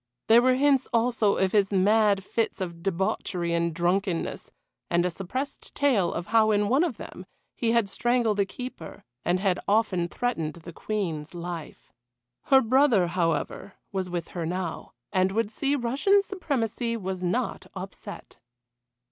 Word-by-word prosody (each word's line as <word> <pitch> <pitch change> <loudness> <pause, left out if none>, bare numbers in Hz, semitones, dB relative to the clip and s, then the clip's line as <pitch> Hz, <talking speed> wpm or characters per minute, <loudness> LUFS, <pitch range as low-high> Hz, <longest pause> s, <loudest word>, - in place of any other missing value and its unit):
There 230 +2 +7
were 255 +1 +4
hints 275 -1 +3
also 230 -3 +2
of 190 -1 +2
his 205 -2 +2
mad 200 +1 +3
fits 225 +3 -2
of 170 -3 -5
debauchery 175 -1 -1
and 170 0 +1
drunkenness, 175 +1 -1 0.4
and 175 +1 +2
a 180 - 0
suppressed 225 - -5
tale 250 -11 +2
of 170 - -4
how 220 +1 +4
in 205 -1 +2
one 270 +7 +4
of 300 -11 -2
them 185 - -9 0.3
he 230 -1 0
had 235 -3 +3
strangled 235 0 +1
a 200 - +4
keeper, 250 -7 -8 0.2
and 175 +2 +1
had 190 -2 +1
often 200 -5 +2
threatened 170 -8 -2
the 170 0 -11
Queen's 170 -8 -3
life. 170 -2 -7 0.5
Her 270 -1 +6
brother, 250 -5 +4
however, 175 +2 -1 0.2
was 190 -2 -2
with 175 -2 -4
her 175 - -4
now, 175 0 -4 0.2
and 185 0 +2
would 220 0 0
see 280 +5 0
Russian 285 +11 +2
supremacy 240 - -2
was 190 -3 -4
not 180 0 -2
upset. - - -9
200 Hz, 155 wpm, -26 LUFS, 175-235 Hz, 0.5 s, There